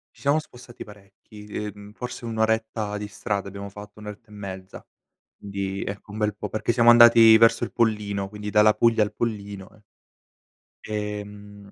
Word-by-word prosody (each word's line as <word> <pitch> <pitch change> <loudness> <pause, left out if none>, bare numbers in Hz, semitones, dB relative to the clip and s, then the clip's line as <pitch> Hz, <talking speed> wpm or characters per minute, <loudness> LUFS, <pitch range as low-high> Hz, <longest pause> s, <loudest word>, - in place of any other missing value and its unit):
Ci - - -20
siamo 145 +2 +2
spostati 125 -5 -9
parecchi, 105 +1 -15
ehm, 105 -1 -7
forse 125 +1 -7
1 115 -1 -5
oretta 110 -1 -1
di 105 - -5
strada 100 -1 -4
abbiamo 100 +1 -8
fatto, 105 +1 -12
1 105 - -11
oretta 105 +2 -10
e - - -18
mezza, 95 -2 -9 0.5
di 100 -1 -5
ecco, 100 +1 -7
un 105 - -7
bel 105 -1 -1
po' - - -6
perché 110 +2 -2
siamo 120 0 +5
andati 115 -1 +8
verso 115 0 +4
il - - -8
Pollino, 105 -4 -1
quindi 105 0 -7
dalla 105 +1 +5
Puglia 115 -2 +3
al 105 +1 -2
Pollino, 100 -4 -5
ehm 110 - -22 1.1
ehm, 105 -1 -7
105 Hz, 175 wpm, -24 LUFS, 100-110 Hz, 1.1 s, andati